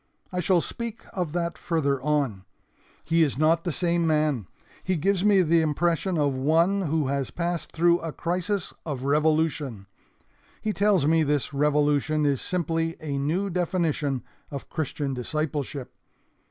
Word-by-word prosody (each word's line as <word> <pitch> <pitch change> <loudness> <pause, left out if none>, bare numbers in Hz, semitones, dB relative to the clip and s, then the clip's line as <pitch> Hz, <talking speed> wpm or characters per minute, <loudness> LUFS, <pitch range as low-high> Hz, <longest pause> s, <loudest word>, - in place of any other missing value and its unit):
I 180 - -1
shall 180 0 +3
speak 230 +3 -6
of 180 -5 -2
that 170 -2 -2
farther 140 -6 0
on. 140 -10 0 0.6
He 165 +1 +2
is 145 -5 +2
not 160 +2 +3
the 175 - 0
same 170 +1 +1
man. 150 - +1 0.4
He 185 - 0
gives 190 +4 +1
me 200 -3 +5
the 165 0 +3
impression 170 +3 0
of 145 -3 +1
one 165 +9 +2
who 155 0 +1
has 140 -2 -1
passed 175 -1 -3
through 170 +1 +3
a 165 - -4
crisis 180 +4 -2
of 140 -5 -4
revolution. 150 -6 +1 0.7
He 215 - -2
tells 200 -7 +3
me 160 +2 +4
this 145 -1 0
revolution 150 +1 +2
is 140 -3 +1
simply 165 -3 -1
a 145 -3 -3
new 175 +8 0
definition 165 -6 0 0.3
of 140 -2 -7
Christian 145 -2 -2
discipleship. 140 0 -3
160 Hz, 150 wpm, -26 LUFS, 145-175 Hz, 0.7 s, me